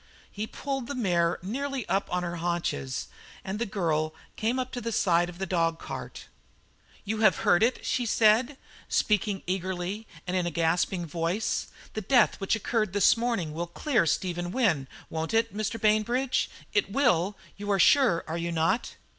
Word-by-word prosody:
He 210 +2 -4
pulled 270 -1 -4
the 285 - -4
mare 175 -7 +1
nearly 270 +4 -3
up 195 +3 0
on 180 0 0
her 175 0 -3
haunches, 165 - -2 0.4
and 195 +2 -4
the 235 - -1
girl 155 -5 -1 0.2
came 230 +4 0
up 255 0 -2
to 245 - -4
the 230 - -3
side 175 -4 +2
of 175 - -10
the 190 - -2
dog 165 -3 +1
cart. - - -7 0.8
"You 215 +1 -2
have 215 -5 +5
heard 175 - +5
it?" 235 +3 +1
she 245 -2 0
said, 230 +6 +3 0.3
speaking 210 -2 +1
eagerly 185 +3 -3 0.2
and 180 +1 -2
in 180 -2 +1
a - - +1
gasping 170 +2 0
voice. 170 +6 -1 0.3
"The 215 - -3
death 240 +3 +3
which 195 - +2
occurred 215 -2 -1
this 205 -2 +5
morning 230 -10 -1
will 170 +2 -3
clear 220 - +1
Stephen 175 +1 -1
Wynne, 180 - +1 0.2
won't 160 +6 -2
it, 225 -2 +1
Mr. 215 +1 -2
Bainbridge? 235 +5 +2 0.2
it 410 - +1
will, 205 -8 +2 0.2
you 205 +1 -6
are 200 - +3
sure, 210 -3 +5
are 165 +2 -3
you 170 0 -2
not?" 165 +7 0
195 Hz, 175 wpm, -28 LUFS, 170-230 Hz, 0.8 s, have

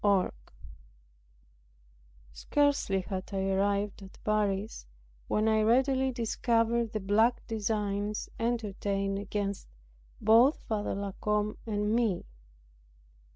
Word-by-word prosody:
CHAPTER 200 -2 +5
19 - - -4 2.0
Scarcely 280 - +1
had 185 +1 -5
I 195 0 0
arrived 200 +1 0
at 190 -1 -12
Paris, 210 - -1 0.4
when 215 +1 +1
I 220 0 +3
readily 260 +4 +3
discovered 230 -1 +1
the 215 - -2
black 215 +5 +2
designs 210 -2 -2
entertained 200 -4 -1
against 200 0 -3 0.5
both 230 +7 +5
Father 210 -3 -2
La 200 0 -3
Combe 210 0 0
and 210 0 0
me. 225 -6 +1
210 Hz, 105 wpm, -30 LUFS, 200-230 Hz, 2.0 s, CHAPTER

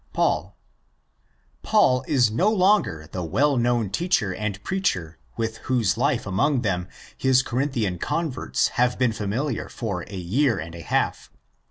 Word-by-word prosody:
Paul. - - 0 1.0
Paul 125 0 +3
is 125 -7 +3
no 180 - +2
longer 190 - +2
the 90 - -4
well 135 - +2
known 120 -4 +1
teacher 135 - +1
and 105 0 -4
preacher 90 - -2 0.2
with 110 -1 -2
whose 120 -6 +2
life 130 +1 0
among 120 +8 +1
them 90 -4 -1 0.3
his 130 0 +3
Corinthian 120 - -1
converts 160 - -1
have 125 0 +1
been 125 -3 +2
familiar 110 +6 -2
for 100 -7 -4
a 100 - -7
year 115 +7 +1
and 85 -1 -6
a 85 - -8
half. - - -1
120 Hz, 145 wpm, -24 LUFS, 95-135 Hz, 1.0 s, Paul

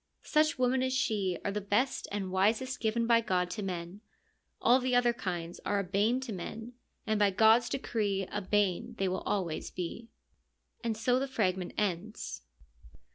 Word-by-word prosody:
Such 310 0 +2
women 255 0 +2
as 260 0 0
she 205 -9 0
are 200 - +1
the 210 +1 -2
best 215 +7 0
and 195 -2 -3
wisest 220 +8 +1
given 230 +1 0
by 230 0 +5
God 180 -5 0
to 210 - -4
men: 180 0 -5 0.6
all 245 +2 +5
the 255 -1 0
other 245 -1 +4
kinds 175 -7 -4
are 205 - 0
a 200 - +1
bane 205 +7 +1
to 250 -5 -5
men, 225 +6 -6 0.3
and 215 -2 +1
by 205 -1 +5
God's 220 +4 +5
decree 210 -7 -1
a 205 - -2
bane 195 -2 0
they 195 - +1
always 185 -2 -2
will - - -27
be. 185 +6 -5 0.4
„ - - -43
And 225 -2 -1
so 250 +3 +2
the 275 - -1
fragment 190 -8 -1
ends. 205 - -2
210 Hz, 180 wpm, -31 LUFS, 190-240 Hz, 0.6 s, by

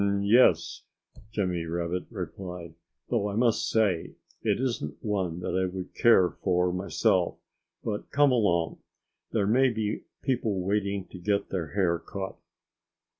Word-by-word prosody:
"Um 100 0 +1
yes!" 115 +5 +4 0.5
Jimmy 90 -5 -1
Rabbit 85 +2 -2
replied, 90 -3 -6 0.4
"though 105 - +1
I 100 - -4
must 115 0 +2
say 100 -7 +1 0.3
it - - +1
isn't 115 - -2
one 95 -5 -1
that 90 - -2
I 95 0 +2
would 90 -1 -6
care 95 -6 +5
for 90 -1 +2
myself... 90 +2 +1 0.5
But 105 -2 -3
come 145 -1 +4
along! 90 -9 +1 0.5
There 105 -3 +1
may 130 +6 +4
be 110 -3 -2 0.2
people 115 -7 0
waiting 100 0 -1
to 90 - -10
get 100 +2 0
their 90 -4 -3
hair 90 -4 +2
cut." 95 -1 -6
100 Hz, 140 wpm, -28 LUFS, 90-105 Hz, 0.5 s, care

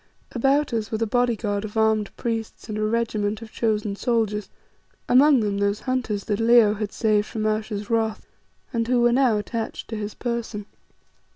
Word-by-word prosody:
About 270 +2 +1
us 220 -2 -2
were 220 - 0
a 225 - +1
bodyguard 225 -3 0
of 215 0 -6
armed 220 -2 +2
priests 225 -2 -4
and 215 - -4
a 215 - -2
regiment 215 -1 -1
of 220 - -11
chosen 210 -3 -1
soldiers, 215 -2 -1 0.6
among 270 +1 +6
them 205 -2 -1
those 200 +1 0
hunters 245 -6 -2
that 205 0 -2
Leo 230 -2 +5
had 210 -1 -4
saved 210 -2 +1
from 215 -1 -3
Ayesha's 215 -1 -2
wrath, 225 -1 -1 0.5
and 230 -1 0
who 250 0 +2
were 240 0 +4
now 250 -4 +3
attached 225 +2 -4
to 225 - -4
his 210 -1 -5
person. 235 -4 -4
220 Hz, 175 wpm, -24 LUFS, 210-235 Hz, 0.6 s, among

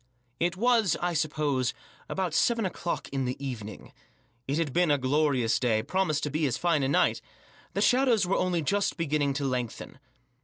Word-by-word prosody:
It 175 +2 0
was, 230 -4 +3
I 175 0 -1
suppose, 145 -5 0 0.3
about 185 -4 -2
seven 230 +5 +2
o'clock 175 -2 -3
in 135 -1 -2
the 125 +1 -2
even 125 -7 -5
ing. 110 - -13 0.5
It 140 +2 -1
had 160 -5 -1
been 175 -1 +3
a 145 - +4
glorious 130 -3 +1
day; 110 -4 +1
promised 170 -2 0
to 145 - -2
be 155 +1 +1
as 125 - -1
fine 170 -4 +1
a 135 - 0
night. 140 - +2 0.5
The - - 0
shadows 250 -6 +3
were 180 - 0
only 175 -3 0
just 200 +6 0
beginning 150 -4 0
to 140 +1 -2
lengthen. 125 0 -4
150 Hz, 185 wpm, -28 LUFS, 135-180 Hz, 0.5 s, a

